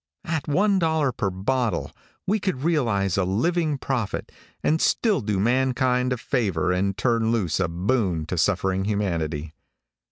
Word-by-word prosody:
At 160 -3 -2
one 195 +6 +3
dollar 160 -5 +1
per 105 -5 -1
bottle, 110 +6 -1 0.3
we 210 +3 +1
could 185 -10 -2
realize 115 - +1
a - - +2
living 150 - 0
profit, 130 -6 -3 0.3
and 160 +2 +2
still 210 - +2
do 105 -3 -1
mankind 125 +2 +1
a 125 - 0
favor 95 -9 0
and 95 +2 0
turn 115 +1 +1
loose 95 -9 0
a 95 - +2
boon 90 -1 0
to 90 - -3
suffering 95 +1 +1
humanity. 85 -7 -2
115 Hz, 150 wpm, -24 LUFS, 95-135 Hz, 0.3 s, one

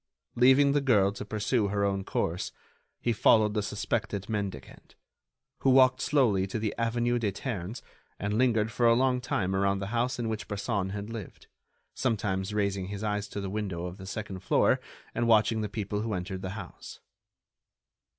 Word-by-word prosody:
Leaving 130 +3 +5
the 145 0 +2
girl 105 -8 +4
to 100 - -7
pursue 105 +1 0
her 100 0 0
own 100 -1 0
course, 90 -1 -2 0.5
he 120 - 0
followed 105 0 +4
the 105 - 0
suspected 100 -1 -2
mendicant, 100 - -5 0.6
who 135 - +2
walked 130 -1 +5
slowly 110 -10 +2
to 95 - -3
the 110 -1 -1
avenue 120 +1 0
des 105 -4 0
Ternes 105 -1 -5 0.3
and 100 +2 -2
lingered 110 -3 +2
for 120 +3 +2
a 115 - +6
long 125 0 +2
time 95 -6 -1
around 100 0 +2
the 95 0 -4
house 120 +2 0
in 120 -2 -2
which 110 -2 -4
Bresson 100 -1 -2
had 100 +2 -5
lived, 110 -5 -8 0.5
sometimes 100 -5 -1
raising 100 -3 -1
his 100 +1 -5
eyes 105 -1 -1
to 100 - -6
the 100 - -4
windows 95 -4 -3
of 90 - -11
the 95 - -9
second 100 -2 -5
floor 95 - +3 0.3
and 120 - 0
watching 110 0 +4
the 105 - -2
people 105 0 -3
who 110 -2 -2
entered 95 +1 -4
the 95 - -4
house. - - -9
105 Hz, 180 wpm, -29 LUFS, 100-115 Hz, 0.6 s, a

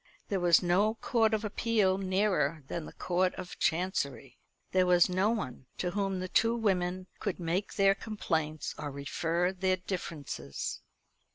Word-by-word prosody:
There 195 - 0
was 175 0 +5
no 200 +5 +3
court 225 -1 +2
of 220 0 0
appeal 210 -3 +1
nearer 185 -6 +1
than 165 +2 -4
the - - -9
Court 180 +1 0
of 185 -1 -8
Chancery. 140 - -1 0.3
There 185 -1 +3
was 175 -1 +6
no 185 +3 +2
one 135 - -3
to 180 - -1
whom 195 -1 -1
the 185 - -3
two 230 +5 +3
women 185 -4 0
could 200 -4 -3
make 175 +4 -2
their 195 -1 +5
complaints 160 -7 -2
or 145 - -3
refer 165 +5 -1
their 185 0 +1
differences. 155 - -5
185 Hz, 155 wpm, -31 LUFS, 165-200 Hz, 0.3 s, was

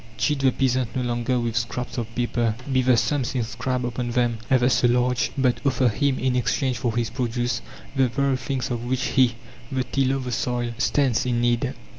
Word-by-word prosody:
Cheat 150 -2 +1
the 135 -1 +4
peasant 130 -3 0
no 130 - 0
longer 120 +1 0
with 115 -2 -2
scraps 120 +2 -2
of 115 -1 -6
paper 120 -2 0 0.2
be 130 - +4
the 125 -1 +4
sums 120 +2 0
inscribed 125 +1 -2
upon 120 0 -3
them 120 -1 +1
ever 130 -2 +4
so 120 -1 +3
large; 125 +2 +2
but 130 -2 +2
offer 130 -3 +2
him 135 +4 +1
in 130 0 0
exchange 125 +1 0
for 115 -1 -1
his 115 -2 0
produce 120 0 -1 0.3
the 135 -1 +4
very 140 +2 +1
things 130 0 -3
of 120 -1 -2
which 130 +1 -1
he, 125 -3 +3 0.4
the 130 -1 0
tiller 135 0 0
of 135 - -3
the 125 - -4
soil, 120 +1 -1
stands 130 -2 +2
in 120 -1 +1
need. 120 -1 +1
125 Hz, 200 wpm, -24 LUFS, 120-130 Hz, 0.4 s, the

